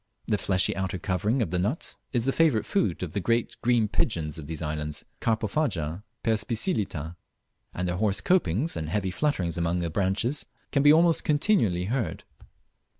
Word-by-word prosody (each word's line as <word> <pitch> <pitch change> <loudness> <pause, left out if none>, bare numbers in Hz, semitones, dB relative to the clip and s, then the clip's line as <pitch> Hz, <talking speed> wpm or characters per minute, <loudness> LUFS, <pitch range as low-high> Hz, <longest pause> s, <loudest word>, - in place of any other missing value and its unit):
The 105 - 0
fleshy 95 -1 +1
outer 95 -1 -2
covering 100 +8 0
of 85 - -4
the 90 - 0
nut 105 - -1 0.2
is 120 -2 +1
the 135 - +3
favourite 150 -8 +3
food 100 - 0
of 85 - -5
the - - 0
great 115 +5 0
green 120 -2 +3
pigeons 80 -7 -1
of 75 - -8
these 80 0 -5
islands 75 -1 -3
(Carpophaga, 110 - -1 0.2
perspicillata), 105 - 0 0.6
and 90 0 -1
their 90 0 -1
hoarse 100 -1 +1
copings 160 - +1
and 80 -1 -3
heavy 95 +1 -1
flutterings 90 - -1
among 85 +1 0
the 85 -2 -2
branches 100 - 0 0.2
can 140 - +3
be 145 +1 +7
almost 165 +1 +4
continually 145 - +2
heard. 120 +3 -2
100 Hz, 165 wpm, -27 LUFS, 85-125 Hz, 0.6 s, be